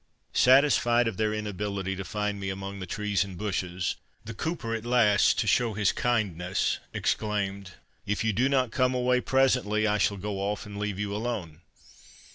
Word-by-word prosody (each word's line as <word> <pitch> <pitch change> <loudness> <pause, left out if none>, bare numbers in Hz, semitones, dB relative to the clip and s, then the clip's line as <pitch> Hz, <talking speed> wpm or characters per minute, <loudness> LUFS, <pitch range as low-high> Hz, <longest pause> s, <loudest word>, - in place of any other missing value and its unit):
Satisfied 125 -3 +4
of 110 -5 -3
their 110 -1 +1
inability 100 -2 -3
to 95 - -5
find 105 +2 -3
me 95 -1 -3
among 95 +1 -5
the 95 - -6
trees 105 0 0
and 95 -3 -9
bushes, 95 -3 -2 0.3
the 115 - -6
cooper 140 -2 -3
at 115 -1 -3
last, 120 -4 +4
to - - +1
show 115 -4 +2
his 105 -2 +2
kindness, 95 -7 0
exclaimed, 100 -3 -2 0.3
"If 105 +2 0
you 110 -1 +1
do 125 +7 +2
not 130 -4 +1
come 130 +1 +1
away 125 0 +2
presently, 125 -6 +2
I 105 0 +1
shall 100 0 +1
go 100 +1 -4
off 100 +1 -2
and 105 -1 -8
leave 105 -2 -2
you 105 0 -3
alone." 105 -8 -4
105 Hz, 175 wpm, -27 LUFS, 100-120 Hz, 0.3 s, Satisfied